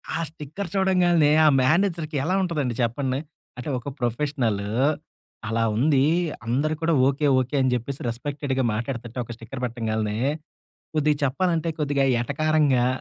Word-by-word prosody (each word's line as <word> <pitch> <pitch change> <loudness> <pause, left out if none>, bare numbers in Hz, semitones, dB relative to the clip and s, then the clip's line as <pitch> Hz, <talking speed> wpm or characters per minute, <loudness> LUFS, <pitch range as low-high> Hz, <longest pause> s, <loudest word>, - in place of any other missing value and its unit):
ఆ - - -1
స్టిక్కర్ 160 +5 -7
చూడంగాల్నే, 175 -5 +3
ఆ - - +7
మేనేజర్‌కి 160 +1 +1
ఎలా 180 +5 +1
ఉంటదండి 150 -10 -1
చెప్పండి? 130 +3 -1 0.4
అంటే 125 +4 -5
ఒక 125 - -8
ప్రొఫెషనలూ 120 -4 -1 0.8
అలా 115 0 0
ఉందీ, 135 +3 +3 0.4
అందరూ 140 +7 0
కూడా 165 0 +2
ఓకే, 140 +2 +1
ఓకే, 130 +3 -2
అని 130 -1 +2
చెప్పేసి 130 +3 -5
రెస్పెక్టెడ్‌గా 135 +2 -2
మాట్టాడతంటే, 120 +1 -5
ఒక 120 - -8
స్టిక్కర్ 120 +3 -8
బెట్టంగాల్నే, 110 -3 -2 0.8
కొద్దిగ 150 0 +2
చెప్పాలంటే, 165 +4 0
కొద్దిగా 145 -2 +1 0.2
ఎటకారంగా, 140 -2 +2
140 Hz, 130 wpm, -24 LUFS, 120-155 Hz, 0.8 s, ఆ